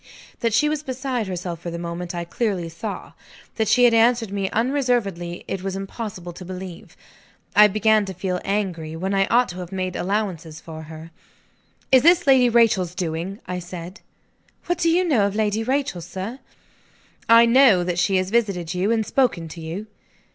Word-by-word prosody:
That 230 - 0
she 230 +8 +3
was 300 -1 -1
beside 260 -5 -3
herself 180 -2 -5
for 175 - -6
the 170 - -5
moment, 170 +1 -5
I 170 0 -3
clearly 185 -3 -2
saw. 200 +5 -6 0.5
That 220 -1 +1
she 245 +4 +4
had 240 -1 +6
answered 230 -1 +3
me 195 -1 -2
unreservedly, 230 -9 -1
it 195 - -3
was 190 0 -4
impossible 195 -3 -6
to 185 - -10
believe. 185 -1 -9 0.6
I 210 0 +8
began 215 +1 +2
to 190 - -6
feel 180 0 -3
angry, 180 -6 -2
when 190 +4 -2
I 195 0 +2
ought 245 +1 +3
to 180 - -8
have 180 0 -7
made 185 -1 -3
allowances 180 -5 -3
for 160 -1 -9
her. 160 +1 -10 0.8
"Is 260 -1 +7
this 345 +4 +5
Lady 260 -3 +5
Rachel's 215 -7 +3
doing?" 175 +4 -4
I 180 0 -4
said. 180 +2 -9 0.6
"What 350 -1 -1
do 335 - +2
you 350 +3 +3
know 255 - +2
of 200 - -5
Lady 215 0 0
Rachel, 260 -7 -1
sir?" 190 +8 -6 0.9
"I 230 0 +8
know 235 -6 +5
that 175 0 -2
she 195 +1 +2
has 185 0 0
visited 195 -7 0
you, 180 +3 0
and 225 -1 +1
spoken 230 -12 +1
to 165 +1 -9
you." 165 +6 -5
195 Hz, 185 wpm, -22 LUFS, 175-230 Hz, 0.9 s, I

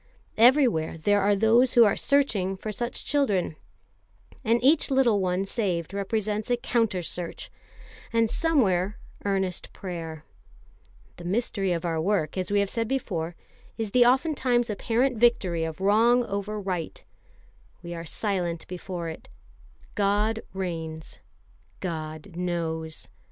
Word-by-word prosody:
Everywhere 235 - +4
there 205 +5 +2
are 200 +1 +3
those 230 +5 +4
who 240 - +8
are 205 - +4
searching 210 -10 +1
for 215 +3 -5
such 240 +3 -4
children; 210 - +1 0.9
and 230 +2 +3
each 290 +4 +4
little 260 -6 +3
one 185 +1 0
saved 190 -6 -2
represents 210 +2 -2
a 245 - +2
counter 225 -6 0
search, 170 0 -5 0.6
and 230 -1 +3
somewhere, 210 - +1 0.3
earnest 190 -2 -1
prayer. 165 -4 -6 0.9
The 175 - -10
mystery 195 0 0
of 170 0 -1
our 165 -2 0
work, 170 -4 0
as 185 -1 -2
we 205 0 +3
have 200 - -1
said 230 -1 -1
before, 175 -10 -2 0.4
is 220 -3 -3
the 245 +1 +5
oftentimes 255 -3 +2
apparent 240 +4 0
victory 190 -8 +3
of 160 0 -4
wrong 225 +5 +4
over 200 +1 -3
right. 185 -5 -4 0.8
We 170 0 -6
are 165 0 -6
silent 175 -2 -2
before 180 -1 -5
it. 160 - -8 0.6
God 210 +2 +1
reigns; 165 -4 -5 0.6
God 160 +1 -5
knows. 165 -3 -3
200 Hz, 130 wpm, -26 LUFS, 175-230 Hz, 0.9 s, who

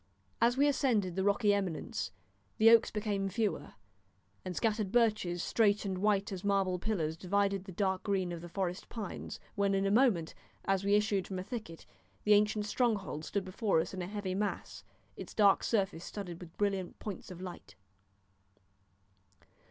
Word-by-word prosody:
As 240 +2 +4
we 285 +2 +5
ascended 225 - +1
the 190 - 0
rocky 205 +1 +3
eminence 190 -5 -2 0.5
the 225 0 +7
oaks 230 -1 +6
became 205 -2 -1
fewer, 210 +1 -2 0.7
and 185 -1 -5
scattered 215 -2 0
birches, 215 -7 +2
straight 210 -2 +2
and 190 -2 -2
white 200 0 +1
as 185 -2 -5
marble 195 -2 +1
pillars, 170 -7 -1
divided 195 +2 0
the 190 - -8
dark 190 0 0
green 190 -3 -1
of 170 -1 -5
the 175 - -9
forest 180 0 -3
pines, 215 -5 -6
when 200 -1 +1
in 195 0 +1
a 195 - +2
moment, 210 -9 +3 0.3
as 195 0 +1
we 200 +1 +3
issued 205 -3 +1
from 190 - -4
a 185 - -3
thicket, 215 -7 -7 0.4
the 210 - +5
ancient 210 0 +3
stronghold 205 - 0
stood 195 +3 -2
before 190 -1 +1
us 165 +4 -2
in 185 - -4
a 175 - -4
heavy 200 -2 -3
mass, 205 +2 -3 0.3
its - - -9
dark 200 -2 +5
surface 195 -6 0
studded 180 -4 -7
with 170 -2 -12
brilliant 195 -3 -1
points 200 -5 -7
of 180 -2 -9
light. 180 - -9
200 Hz, 170 wpm, -32 LUFS, 185-210 Hz, 0.7 s, the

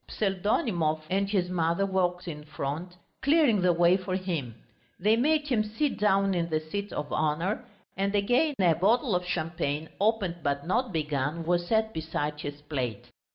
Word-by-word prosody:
Pseldonimov 190 - 0
and 195 +1 +1
his 190 -4 +1
mother 170 +1 +1
walked 180 -2 0
in 150 -3 -6
front, 150 +4 -5 0.2
clearing 280 - +4
the 180 0 +4
way 175 +1 +4
for 185 -1 -3
him. 165 - -3 0.4
They 210 +4 +4
made 300 +5 +2
him 230 -5 +2
sit 225 +7 -2
down 195 -1 +3
in 170 -2 -1
the 155 -1 +1
seat 200 +6 -5
of 145 - -4
honour, 155 +6 0 0.3
and 200 +1 0
again 245 +9 +2
a 175 -3 +5
bottle 215 - +2
of 180 - 0
champagne, 160 -3 -2
opened 200 -4 +1
but 140 -1 -1
not 235 +6 0
begun, 150 0 -2
was 175 0 +1
set 220 +1 +1
beside 150 -2 -3
his 145 0 -6
plate. 130 -8 -4
180 Hz, 165 wpm, -28 LUFS, 155-205 Hz, 0.4 s, a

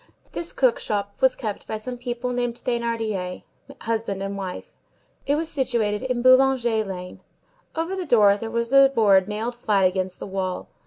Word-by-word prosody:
This 340 - -4
cook 255 -3 +2
shop 200 -1 -2
was 260 -1 +4
kept 215 -4 -5
by 220 - -3
some 245 +4 -6
people 245 0 -3
named 245 -1 -1
Thénardier, 225 -7 -2 0.4
husband 220 -4 -2
and 195 0 -4
wife. 190 -2 -6 0.5
It 285 - +3
was 320 +2 -1
situated 235 -8 0
in 250 -2 -2
Boulanger 255 -3 +4
Lane. 180 -2 -7 0.6
Over 330 +4 -2
the 370 -3 -4
door 210 -6 +5
there 225 +2 -5
was 235 +2 -2
a 275 0 +8
board 205 -7 +4
nailed 220 +3 -3
flat 210 -5 +1
against 185 0 0
the - - -7
wall. 190 -2 -4
230 Hz, 170 wpm, -24 LUFS, 200-250 Hz, 0.6 s, a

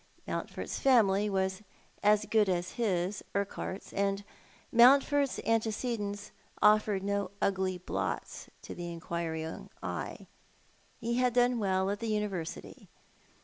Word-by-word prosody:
Mountford's - - -4
family 210 -6 +4
was 190 0 -1 0.4
as 210 0 +4
good 215 -3 +3
as 180 0 -1
bis, 195 -4 -1
Urquhart's; 200 -1 -3
and 200 0 0 0.5
Mountford's 275 +3 +5
antecedents 220 -2 -1 0.3
offered 210 -2 +4
no 200 -1 -1
ugly 190 -1 0
blots 180 - -4
to - - -7
the 175 -1 -6
inquiriug 165 -1 -4
eye. - - -5 0.7
He 235 +1 -1
had 250 -1 +2
done 245 -1 +3
well 190 -1 +1
at 205 - -3
the 230 - -3
University. 205 -6 -4
200 Hz, 115 wpm, -31 LUFS, 190-225 Hz, 0.7 s, Mountford's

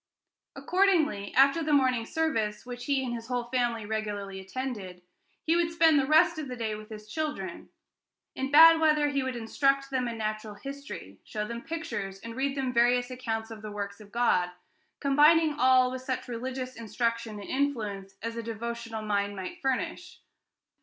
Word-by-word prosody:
Accordingly, 335 - +2
after 275 +4 +5
the 305 -1 0
morning 255 -5 +3
service, 225 -11 -1
which 245 0 -7
he 275 -2 +1
and 240 - -3
his 230 -1 -6
whole 250 -1 -1
family 240 -4 0
regularly 205 -2 -4
attended, 190 -4 -6 0.4
he 325 - +2
would 340 -1 +2
spend 325 -3 +5
the 270 - 0
rest 320 +2 +5
of 300 - -4
the 250 - -5
day 225 -3 -2
with 215 +1 -8
his 215 -1 -9
children. 215 - -4 0.6
In 265 +1 -3
bad 325 +3 +9
weather 305 -2 +3
he 280 -1 0
would 260 -1 -3
instruct 275 +4 +1
them 255 -2 0
in 230 -1 -4
natural 215 -1 -3
history, 280 +7 -8
show 210 -1 -4
them 235 +1 -5
pictures, 240 -13 -5
and 230 0 -8
read 275 +1 -1
them 260 -2 -1
various 245 +1 +3
accounts 225 -3 -4
of 220 -1 -8
the 215 - -6
works 200 0 -5
of 205 -1 -14
God, 220 -7 +2 0.5
combining 300 +3 +5
all 255 -1 +5
with 260 0 -5
such 260 0 -3
religious 255 +2 -5
instruction 230 -1 -2
and 200 - -9
influence 210 -9 -2
as 230 0 -3
a 230 - -3
devotional 230 0 -5
mind 205 -1 -1
might 185 -2 -7
furnish. 335 +7 -2
245 Hz, 175 wpm, -28 LUFS, 215-280 Hz, 0.6 s, bad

